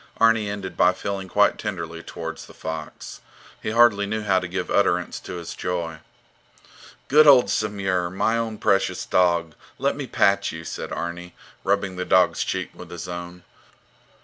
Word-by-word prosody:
Arni 115 -2 +3
ended 100 -2 -5
by 90 +1 +4
feeling 95 0 -4
quite 105 +2 +3
tenderly 85 -5 -5
towards - - -7
the - - -15
fox. 80 -1 -7 0.4
He - - -3
hardly 110 -3 +4
knew 110 +1 -2
how 95 -2 +3
to 90 - -5
give 90 +3 -4
utterance 90 -4 +1
to - - -8
his 85 -1 -6
joy. 85 -3 -3 1.1
Good 150 +2 +6
old 125 -8 +7
Samur, 95 -5 -1
my 95 +5 0
own 115 -2 -2
precious 100 -2 +1
dog, 85 -3 +2 0.2
let - - 0
me - - -5
pat 100 0 +2
you, 80 0 -7
said - - -6
Arni, 85 +1 -5 0.3
rubbing 100 -1 0
the 90 - -1
dog's 90 -1 +3
cheek - - -3
with - - -11
his 85 -1 -7
own. 90 0 -7
95 Hz, 165 wpm, -24 LUFS, 85-105 Hz, 1.1 s, old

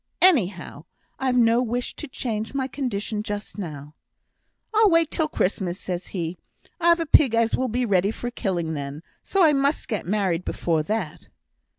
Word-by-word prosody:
Anyhow, 190 - +2 0.3
I've 260 -2 +1
no 235 0 +4
wish 245 0 -2
to 305 - -5
change 225 -2 -4
my 265 -1 0
condition 230 -5 -3
just 210 0 -6
now.' 150 -5 -7 0.8
'I'll 435 -1 +5
wait 330 -2 +3
till 315 - +1
Christmas,' 185 - -1
says 180 0 -4
he. 175 -2 -4 0.4
'I've 340 0 +4
a - - -1
pig 275 -6 +5
as 230 0 +2
will 260 - 0
be 245 +2 0
ready 195 -2 +2
for 240 +2 -4
killing 175 -8 -2
then, 145 +1 -5 0.2
so 390 -2 +1
I 310 -2 +6
must 280 +2 +1
get 210 -7 -3
married 190 -4 0
before 165 -3 0
that.' 215 +8 -4
220 Hz, 170 wpm, -24 LUFS, 180-265 Hz, 0.8 s, I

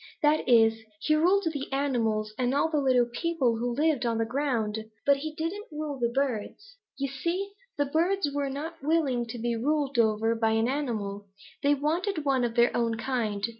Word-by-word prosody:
That 300 -2 +3
is, 225 -2 +5 0.2
he 305 - +2
ruled 360 +6 +3
the 280 -2 -5
animals 225 -6 0
and 250 +1 +1
all 320 +3 +2
the 305 - +2
little 255 -3 +3
people 245 -1 0
who 240 +2 -1
lived 300 -2 +2
on 230 -1 0
the 225 - +1
ground, 225 -4 -1 0.2
but 280 0 +5
he 305 +2 -5
didn't 360 +8 -4
rule 300 -2 -4
the 235 -1 +1
birds. 275 - -3 0.2
You 275 - -1
see 340 +9 -3 0.3
the 285 - +2
birds 335 +5 +1
were 285 -1 -1
not 315 +4 -6
willing 275 -6 +1
to 230 - -6
be 235 0 -1
ruled 280 +1 0
over 220 0 +3
by 225 -1 +1
an 225 +1 +2
animal. 215 -8 -3 0.3
They 285 +1 +3
wanted 315 +3 -1
one 265 -3 +2
of 235 -1 -1
their 240 0 +4
own 230 -1 0
kind. 225 -4 -2
270 Hz, 190 wpm, -28 LUFS, 230-305 Hz, 0.3 s, is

